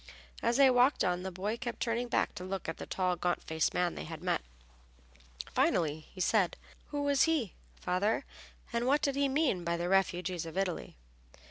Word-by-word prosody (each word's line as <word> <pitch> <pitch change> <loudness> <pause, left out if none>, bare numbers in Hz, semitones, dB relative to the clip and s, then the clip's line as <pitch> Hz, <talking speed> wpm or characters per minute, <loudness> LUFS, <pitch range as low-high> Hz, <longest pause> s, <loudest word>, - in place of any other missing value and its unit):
As 235 - +2
they 275 -2 +7
walked 250 +3 +4
on 180 0 +1
the 190 +1 -4
boy 200 +5 -2
kept 240 -1 -5
turning 235 +1 -1
back 235 - +1
to 180 - -7
look 190 0 -4
at 165 - -3
the - - -7
tall 185 -1 0
gaunt 175 0 -1
faced 160 0 0
man 175 -1 +1
they - - -6
had 160 +1 -8
met. 180 - +1 1.1
Finally 155 -2 +1
he 185 - -12
said, 185 -1 +2 0.3
"Who 290 -1 -3
was 285 -2 +4
he, 305 - 0 0.3
father, 200 +8 0 0.5
and 235 +1 0
what 285 +3 +3
did 280 -1 +1
he 280 0 +2
mean 270 - +1
by 170 0 0
the 175 +1 -2
refugees 180 -3 +1
of 165 - -7
Italy?" 190 - -2
190 Hz, 195 wpm, -32 LUFS, 175-245 Hz, 1.1 s, they